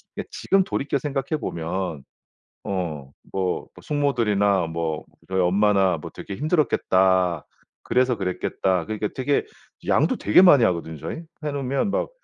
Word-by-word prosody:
근데 -, -, -5 dB
지금 195 Hz, 0 st, +2 dB
돌이켜 140 Hz, -7 st, -1 dB
생각해 140 Hz, +2 st, -2 dB
보면 80 Hz, -, -4 dB, 1.0 s
어 80 Hz, -8 st, -3 dB, 0.2 s
뭐 95 Hz, -2 st, -1 dB
뭐 -, -, -15 dB
숙모들이나 105 Hz, -, +1 dB
뭐 80 Hz, -1 st, -3 dB, 0.2 s
저희 95 Hz, 0 st, 0 dB
엄마나 95 Hz, 0 st, +3 dB
뭐 -, -, -8 dB
'되게 100 Hz, -, -7 dB
힘들었겠다. 95 Hz, -, +2 dB, 0.4 s
그래서 125 Hz, -1 st, +2 dB
그랬겠다.' 90 Hz, -1 st, -1 dB
그러니까 105 Hz, -1 st, -3 dB
되게 140 Hz, +2 st, 0 dB, 0.4 s
양도 -, -, +2 dB
되게 105 Hz, -, +5 dB
많이 145 Hz, -10 st, +7 dB
하거든요 85 Hz, -5 st, -1 dB
저희. -, -, -5 dB, 0.3 s
해 150 Hz, -, -1 dB
놓으면 140 Hz, +6 st, -1 dB
막 -, -, -1 dB
100 Hz, 315 characters per minute, -24 LUFS, 90-135 Hz, 1.0 s, 많이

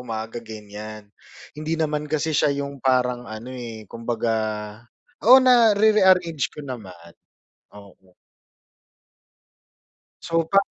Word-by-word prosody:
umaga 115 Hz, 0 st, -6 dB
ganyan, 105 Hz, -1 st, -10 dB, 0.4 s
hindi 155 Hz, +2 st, -3 dB
naman 150 Hz, -1 st, -2 dB
kasi 155 Hz, +1 st, -1 dB
siya 150 Hz, -, +3 dB, 0.2 s
yung 140 Hz, -1 st, -9 dB
parang 125 Hz, -2 st, 0 dB
ano, 110 Hz, +4 st, -8 dB
eh, 115 Hz, -3 st, -8 dB
kumbaga 115 Hz, +1 st, -3 dB, 1.0 s
oo, 255 Hz, -, +11 dB
na-re-rearrange 210 Hz, -, +4 dB
ko 150 Hz, -, -10 dB
naman. 90 Hz, -10 st, -9 dB, 0.7 s
Oo. 95 Hz, -2 st, -18 dB, 2.1 s
So 165 Hz, 0 st, 0 dB
pa 195 Hz, -, +5 dB
125 Hz, 100 wpm, -23 LUFS, 110-160 Hz, 2.1 s, oo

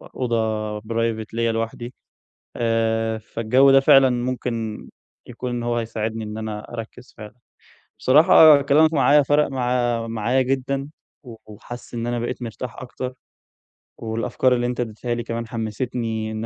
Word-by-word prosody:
أوضة 110 Hz, -3 st, -1 dB
Private 115 Hz, 0 st, -2 dB
ليّا 115 Hz, 0 st, 0 dB
لوحدي. 115 Hz, +2 st, -4 dB, 0.6 s
آآ 115 Hz, -1 st, 0 dB
فالجَو 115 Hz, +5 st, +2 dB
ده 135 Hz, -, +7 dB
فعلًا 135 Hz, -1 st, +6 dB
ممكن 120 Hz, -3 st, -3 dB, 0.4 s
يكون 125 Hz, +1 st, -6 dB
إن 120 Hz, -1 st, -3 dB
هو 120 Hz, 0 st, -1 dB
هيساعدني 115 Hz, -1 st, -3 dB
إن 105 Hz, +1 st, -6 dB
أنا 110 Hz, +1 st, -6 dB
أركّز 115 Hz, +2 st, -9 dB
فعلًا. 105 Hz, -1 st, -10 dB, 0.7 s
بصراحة 155 Hz, 0 st, +7 dB
كلامك 155 Hz, +3 st, +4 dB
معايا 145 Hz, 0 st, +4 dB
فرق 145 Hz, +2 st, +2 dB
مع 120 Hz, -3 st, -1 dB
معايا 115 Hz, +3 st, 0 dB
جدًا 135 Hz, +1 st, -2 dB, 0.3 s
و 120 Hz, -4 st, -11 dB
وحاسس 120 Hz, +3 st, -11 dB
إن 115 Hz, 0 st, -3 dB
أنا 120 Hz, 0 st, -1 dB
بقيت 120 Hz, +2 st, -4 dB
مرتاح 120 Hz, +1 st, -6 dB
أكتر 130 Hz, 0 st, -6 dB, 0.8 s
والأفكار 115 Hz, +3 st, 0 dB
اللي 120 Hz, 0 st, -1 dB
أنت 125 Hz, 0 st, -3 dB
إدّيتها 120 Hz, +1 st, -3 dB
لي 120 Hz, 0 st, -3 dB
كمان 115 Hz, 0 st, -5 dB
حمّسِتني 115 Hz, -1 st, -3 dB
إن 110 Hz, +1 st, -4 dB
120 Hz, 140 wpm, -22 LUFS, 110-125 Hz, 0.8 s, ده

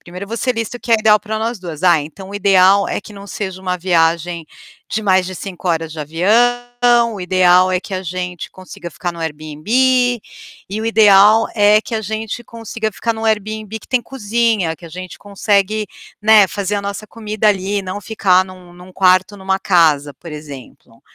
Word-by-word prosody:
Primero, 180 Hz, +3 st, -9 dB
você 230 Hz, +4 st, -2 dB
lista 230 Hz, +1 st, -4 dB
o -, -, -30 dB
que 235 Hz, -, -8 dB
é -, -, +7 dB
ideal 215 Hz, -1 st, +4 dB
para 220 Hz, +1 st, -4 dB
nós 225 Hz, 0 st, -3 dB
2, 170 Hz, -3 st, -8 dB
"Ah, 175 Hz, -3 st, +5 dB
então 190 Hz, +6 st, -10 dB
o -, -, -9 dB
ideal 195 Hz, 0 st, +4 dB
é -, -, -2 dB
que 210 Hz, -, -13 dB
não 200 Hz, 0 st, -11 dB
seja 190 Hz, -2 st, -6 dB
uma 180 Hz, -1 st, -2 dB
viagem 170 Hz, -1 st, 0 dB, 0.5 s
de 220 Hz, -, -2 dB
mais 185 Hz, -3 st, +2 dB
de 185 Hz, -, -6 dB
5 185 Hz, -1 st, -6 dB
horas 165 Hz, -2 st, -1 dB
de 160 Hz, -, -7 dB
avião, 240 Hz, +8 st, +2 dB
o 200 Hz, -, -7 dB
ideal 185 Hz, 0 st, +4 dB
é 185 Hz, -, +1 dB
que 195 Hz, -, -11 dB
a 185 Hz, -, -3 dB
gente 180 Hz, 0 st, -5 dB
consiga 185 Hz, -1 st, -10 dB
ficar 175 Hz, +1 st, -4 dB
no 170 Hz, -, -11 dB
Airbnb, 155 Hz, +2 st, -7 dB, 1.0 s
e 210 Hz, +2 st, -3 dB
o 225 Hz, -, -3 dB
ideal 215 Hz, 0 st, +6 dB
é 210 Hz, 0 st, +5 dB
que 230 Hz, -, -6 dB
a 220 Hz, -, -1 dB
gente 220 Hz, +2 st, -5 dB
consiga 225 Hz, -1 st, -5 dB
ficar 230 Hz, +3 st, -2 dB
no 225 Hz, 0 st, -6 dB
Airbnb 215 Hz, 0 st, -2 dB
que -, -, -17 dB
tem 255 Hz, -2 st, +1 dB
cozinha, 225 Hz, -7 st, -1 dB
que 170 Hz, +1 st, -13 dB
a -, -, -10 dB
gente 180 Hz, +2 st, -9 dB
consegue, 205 Hz, +1 st, 0 dB, 0.4 s
né, 215 Hz, -2 st, +6 dB
fazer 200 Hz, +1 st, -3 dB
a -, -, -1 dB
nossa 200 Hz, +2 st, -5 dB
comida 215 Hz, -1 st, -1 dB
ali 200 Hz, 0 st, 0 dB
e 200 Hz, -, -4 dB
não 190 Hz, +2 st, -5 dB
ficar 190 Hz, -3 st, +2 dB
num 185 Hz, -1 st, -14 dB
num 180 Hz, +1 st, -14 dB
quarto, 190 Hz, +1 st, +3 dB
numa 190 Hz, 0 st, -1 dB
casa", 155 Hz, -7 st, +2 dB
por 165 Hz, 0 st, -11 dB
exemplo. 140 Hz, -6 st, -11 dB
195 Hz, 200 wpm, -17 LUFS, 180-215 Hz, 1.0 s, é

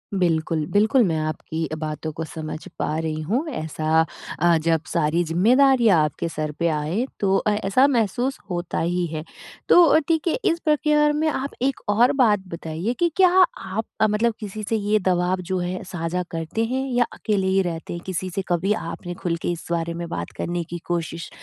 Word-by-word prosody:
बिल्कुल। 165 Hz, -3 st, +1 dB
बिल्कुल 215 Hz, +6 st, +4 dB
मैं 165 Hz, -6 st, +1 dB
आपकी 155 Hz, +1 st, -3 dB
अ, -, -, -2 dB
बातों 155 Hz, 0 st, -4 dB
को 165 Hz, -, -2 dB
समझ 155 Hz, 0 st, -6 dB, 0.2 s
पा 155 Hz, -, -1 dB
रही 155 Hz, -1 st, -2 dB
हूँ। 235 Hz, -, -1 dB
ऐसा 160 Hz, -, 0 dB, 0.3 s
अ, 170 Hz, +1 st, +4 dB
जब 165 Hz, -2 st, +3 dB
सारी 160 Hz, +4 st, +1 dB
ज़िम्मेदारियाँ 225 Hz, -, +4 dB
आपके 150 Hz, +2 st, -2 dB
सर 155 Hz, -1 st, -3 dB
पे 170 Hz, -, +2 dB
आए 160 Hz, +10 st, -1 dB
तो 195 Hz, -1 st, +2 dB
अ, 210 Hz, -, +1 dB
ऐसा 210 Hz, +6 st, +3 dB
महसूस 245 Hz, +1 st, 0 dB
होता 175 Hz, -1 st, -2 dB
ही 175 Hz, +1 st, 0 dB
है। 155 Hz, -1 st, -5 dB, 0.5 s
तो 335 Hz, -2 st, +7 dB
ठीक 325 Hz, 0 st, +1 dB
है, 335 Hz, -, +2 dB
इस 335 Hz, -, +2 dB
प्रक्रिया 300 Hz, -1 st, +3 dB
में 305 Hz, +2 st, 0 dB
आप 280 Hz, -1 st, -3 dB
एक 270 Hz, 0 st, 0 dB
और 235 Hz, +6 st, +4 dB
बात 210 Hz, -4 st, +4 dB
बताइए 170 Hz, +5 st, -3 dB
कि 345 Hz, -, +3 dB
क्या 375 Hz, -1 st, +6 dB, 0.3 s
आप 200 Hz, +4 st, -4 dB, 0.2 s
मतलब 215 Hz, +2 st, +2 dB
किसी 215 Hz, 0 st, -6 dB
से 225 Hz, -, +1 dB
ये 210 Hz, 0 st, +1 dB
दबाव 180 Hz, 0 st, +1 dB
जो 185 Hz, -, 0 dB
है 180 Hz, +1 st, -3 dB
साझा 180 Hz, -1 st, -3 dB
करते 165 Hz, +7 st, -2 dB
हैं 260 Hz, +3 st, -1 dB
या 245 Hz, -1 st, +3 dB
अकेले 200 Hz, -3 st, -1 dB
ही 190 Hz, +1 st, +3 dB
रहते 170 Hz, -2 st, -4 dB
हैं? 170 Hz, -, -6 dB
किसी 185 Hz, 0 st, -3 dB
से 195 Hz, -, 0 dB
कभी 180 Hz, +4 st, +1 dB
आपने 175 Hz, -3 st, -5 dB
खुल 175 Hz, -1 st, -2 dB
के -, -, -1 dB
इस 170 Hz, -1 st, -6 dB
बारे 170 Hz, 0 st, -1 dB
में 170 Hz, 0 st, -5 dB
बात -, -, -4 dB
करने 175 Hz, 0 st, -2 dB
की 175 Hz, -, -4 dB
कोशिश 170 Hz, -1 st, -3 dB
180 Hz, 195 wpm, -23 LUFS, 165-225 Hz, 0.5 s, तो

